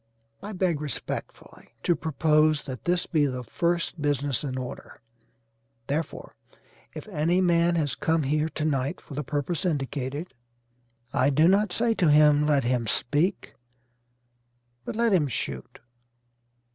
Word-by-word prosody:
I 210 +2 -7
beg 180 -5 0
respectfully 145 -5 -6
to 175 - +3
propose 155 -1 +2
that 130 -3 -8
this 175 0 +1
be 150 -3 +2
the 125 -2 -4
first 170 +3 -1
business 145 -2 0
in 130 -3 -3
order: 125 -1 -7 0.9
therefore 155 +4 -4 0.6
if - - -8
any 170 0 +1
man 170 -1 +3
has 145 -5 0
come 160 -1 0
here 150 +3 0
to 155 - -3
night 135 -3 -1
for - - -12
the 150 +2 -3
purpose 145 +4 -2
indicated, 140 -1 -3 0.8
I 130 - +3
do 155 +4 +4
not 200 +3 +3
say 230 0 +1
to 180 -7 +2
him 150 0 +5
let 145 -3 +3
him 120 -1 0
speak, 150 - 0 1.3
but - - -5
let 230 -1 +2
him 160 -6 +3
shoot." 130 - -4
150 Hz, 140 wpm, -26 LUFS, 140-170 Hz, 1.3 s, him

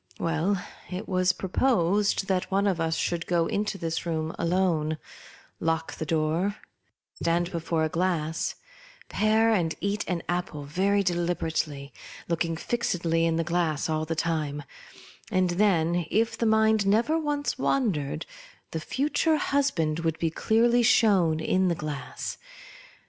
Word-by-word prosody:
Well, 170 +4 0 0.3
it 180 +3 -5
was 185 -1 +2
proposed 200 -1 +1
that 185 -2 0
one 195 +1 +1
of 185 -4 +1
us 165 0 0
should 170 -1 -2
go 170 -2 +2
into 205 +3 -1
this 165 -3 -3
room 160 -1 -2
alone, 170 -3 +1 0.6
lock 165 0 -1
the 160 - -5
door, 165 +6 0 0.7
stand 170 +1 +1
before 165 -1 -1
a 155 - +1
glass, 165 -2 -1 0.5
pare 220 +2 +3
and 165 -6 0
eat 200 +1 -1
an 175 -2 -2
apple 175 -4 -2
very 195 +7 +1
deliberately, 165 -5 -2 0.3
looking 165 -1 -1
fixedly 165 -6 0
in 165 - +1
the 165 - +1
glass 170 -3 0
all 155 0 0
the 165 +1 -2
time; 155 -3 -1 0.7
and 185 -1 +2
then, 175 -3 +2
if 225 +2 +1
the 230 - 0
mind 220 -2 +3
never 235 +11 +3
once 290 -3 -2
wandered, 195 - 0 0.5
the 160 - -2
future 295 - +1
husband 270 - 0
would 165 -1 -1
be 165 -1 -1
clearly 235 +7 +3
shown 200 -9 +4
in 185 +3 +1
the 170 - +1
glass. 140 -5 -5
175 Hz, 140 wpm, -27 LUFS, 160-205 Hz, 0.7 s, shown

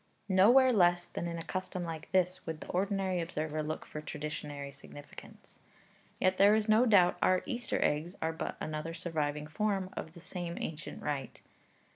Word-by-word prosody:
' - - -41
Nowhere 240 +7 +6
less 175 -3 +4
than 170 - -4
in 170 0 -4
a 165 - -5
custom 185 0 -4
like 160 -2 -6
this 185 0 +1
would 160 -1 -4
the - - -9
ordinary 190 -1 0
observer 155 -2 -3
look 155 +1 -4
for 150 - -7
traditionary 150 -2 -5
significance; 145 +1 -13 0.6
yet 185 0 +2
there 200 +2 +7
is 220 0 +1
no 220 +3 +5
doubt 180 -5 +5
our 185 0 +3
Easter 240 -1 -2
eggs 155 +5 0
are 160 0 -1
but 160 - -4
another 155 +2 -4
surviving 150 -4 -2
form 190 +3 -1
of 160 - -6
the 170 - -12
same 175 0 -5
ancient 155 -1 -6
rite. 140 -4 -4
175 Hz, 175 wpm, -32 LUFS, 155-190 Hz, 0.6 s, there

